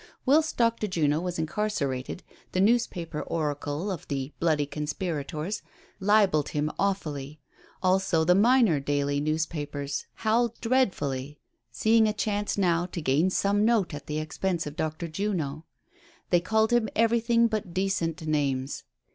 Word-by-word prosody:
Whilst 305 +4 +3
Dr. 230 -2 +2
Juno 155 -5 +1
was 180 -1 -3
incarcerated, 160 -5 -2 0.3
the 185 - 0
newspaper 185 -7 +1
oracle 150 +3 -2
of 185 - -6
the 135 0 -3
bloody 155 -3 +2
conspirators 150 +3 -3 0.4
libeled 195 -7 +3
him 150 +1 -1
awfully; 155 -7 -2 0.4
also 185 -3 +2
the 180 +3 +5
minor 220 - +4
daily 145 0 0
newspapers 150 -2 -2
howled 235 +1 +1
dreadfully, 150 - 0 0.3
seeing 220 0 +3
a 215 - 0
chance 210 -1 -1
now 175 -3 +2
to 175 - -6
gain 150 +4 +2
some 200 +2 +1
note 220 -7 +2
at 145 - -8
the 150 - -2
expense 165 +3 -2
of 150 0 -6
Dr. 160 +1 -3
Juno. 160 -4 -3 0.7
They 175 - +5
called 220 +5 +2
him 235 -3 +3
everything 230 +1 +3
but 215 -5 -3
decent 170 -4 -1
names. 140 -3 -1
170 Hz, 135 wpm, -27 LUFS, 150-210 Hz, 0.7 s, the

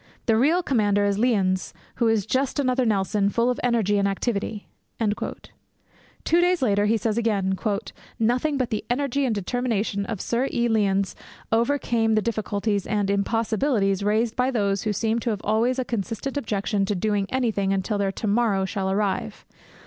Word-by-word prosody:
The 225 - +3
real 310 +10 +3
commander 205 -8 +2
is 200 0 0
Lyons, 190 -8 +1 0.2
who 235 - +2
is 220 -3 +2
just 265 +4 0
another 255 -2 +1
Nelson 200 -1 +1
full 235 +4 +1
of 250 - -4
energy 220 -5 +2
and 200 - +2
activity.' 205 +1 -2 0.3
Two 225 +8 -4
days 355 -4 +2
later, 205 -3 +2
he 225 +2 +3
says 220 +1 -1
again, 200 -4 0 0.6
'Nothing 250 +6 +1
but 255 -3 -1
the 215 - -2
energy 275 +2 0
and 235 -4 0
determination 205 -1 -1
of 225 -4 -4
Sir 240 +6 0
E. 240 -1 +1
Lyons 200 -3 +1 0.4
overcame 230 -2 +1
the 215 - +3
difficulties 210 -3 -1
and 205 -2 0
"impossibilities" 215 0 +1
raised 220 +3 +1
by 250 +1 +1
those 200 -6 0
who 215 - -1
seem 225 +2 0
to 235 - -2
have 210 -3 -2
always 230 +5 +1
a 255 - -1
consistent 230 +4 -3
objection 205 -6 -1
to 205 - -1
doing 200 +1 0
anything 220 -7 0
until 195 +2 -1
their 195 -1 +1
"to 205 - -6
morrow" 205 -2 +2
shall 190 0 -2
arrive. 195 -1 -2
220 Hz, 170 wpm, -24 LUFS, 200-240 Hz, 0.6 s, The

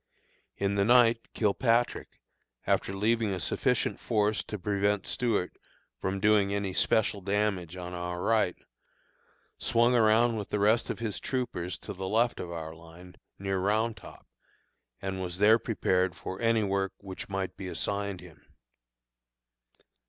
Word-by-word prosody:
In 100 0 0
the 100 0 +2
night, 115 0 +4
Kilpatrick, 115 +3 +1 0.5
after - - +1
leaving 110 0 +1
a - - -5
sufficient - - 0
force 105 -1 +1
to 105 - -5
prevent 100 +1 0
Stuart 110 -7 -1 0.4
from 95 +1 -2
doing 105 -1 +3
any 100 -2 -2
special 105 +1 +1
damage 100 -3 -1
on 90 0 -6
our 90 0 -4
right, 110 -2 +2 1.0
swung 120 +2 +3
around 115 0 +4
with 105 - -5
the - - -1
rest 105 +3 +2
of - - -2
his 115 -3 -3
troopers 90 -10 -3
to - - -8
the 95 0 -5
left 115 +4 +1
of 85 - -5
our 80 -2 -6
line, 85 +2 -14 0.2
near 95 -1 -2
Round 110 +4 +1
Top, 110 - -13 0.8
and 95 -1 -3
was 90 -1 -4
there 110 +3 +6
prepared 95 -5 0
for 95 +2 -7
any 115 -1 +3
work 95 -1 -1
which 95 -1 -8
might 95 -1 -3
be 95 - -7
assigned 100 0 -2
him. 80 -5 -15
100 Hz, 145 wpm, -29 LUFS, 95-110 Hz, 1.0 s, there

